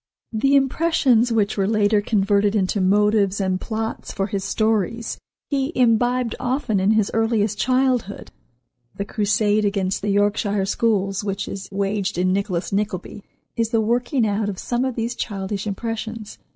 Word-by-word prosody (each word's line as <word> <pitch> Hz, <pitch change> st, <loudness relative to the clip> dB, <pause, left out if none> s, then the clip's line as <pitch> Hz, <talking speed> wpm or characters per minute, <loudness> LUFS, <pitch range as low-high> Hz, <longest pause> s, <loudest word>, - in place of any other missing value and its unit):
The 275 Hz, +6 st, +2 dB
impressions 270 Hz, -4 st, +3 dB
which 215 Hz, -3 st, +1 dB
were 195 Hz, -1 st, +1 dB
later 210 Hz, -1 st, +2 dB
converted 205 Hz, 0 st, +1 dB
into 195 Hz, 0 st, +1 dB
motives 205 Hz, +1 st, +2 dB
and 185 Hz, -1 st, -1 dB
plots 220 Hz, 0 st, -4 dB
for 195 Hz, -, -2 dB
his 195 Hz, -1 st, -3 dB
stories 220 Hz, +2 st, -1 dB, 0.3 s
he 275 Hz, +1 st, 0 dB
imbibed 245 Hz, 0 st, +2 dB
often 245 Hz, -5 st, 0 dB
in 195 Hz, +3 st, +3 dB
his 215 Hz, -2 st, +1 dB
earliest 220 Hz, -2 st, +1 dB
childhood. 255 Hz, -2 st, 0 dB, 0.6 s
The 200 Hz, -, -3 dB
crusade 210 Hz, 0 st, +1 dB
against 195 Hz, -2 st, -1 dB
the 205 Hz, -, -2 dB
Yorkshire 205 Hz, 0 st, +1 dB
schools 200 Hz, -2 st, 0 dB
which 195 Hz, -1 st, -3 dB
is 195 Hz, -1 st, -7 dB
waged 200 Hz, 0 st, -1 dB
in 185 Hz, +1 st, +2 dB
"Nicholas 195 Hz, -2 st, -2 dB
Nickleby," 200 Hz, 0 st, -3 dB, 0.3 s
is 230 Hz, -1 st, 0 dB
the 230 Hz, -1 st, +1 dB
working 240 Hz, +3 st, +1 dB
out 205 Hz, 0 st, 0 dB
of 195 Hz, -, -5 dB
some 245 Hz, +5 st, -1 dB
of 260 Hz, -2 st, -2 dB
these 230 Hz, +1 st, -2 dB
childish 200 Hz, -2 st, -4 dB
impressions. 220 Hz, +1 st, -5 dB
210 Hz, 150 wpm, -22 LUFS, 200-230 Hz, 0.6 s, impressions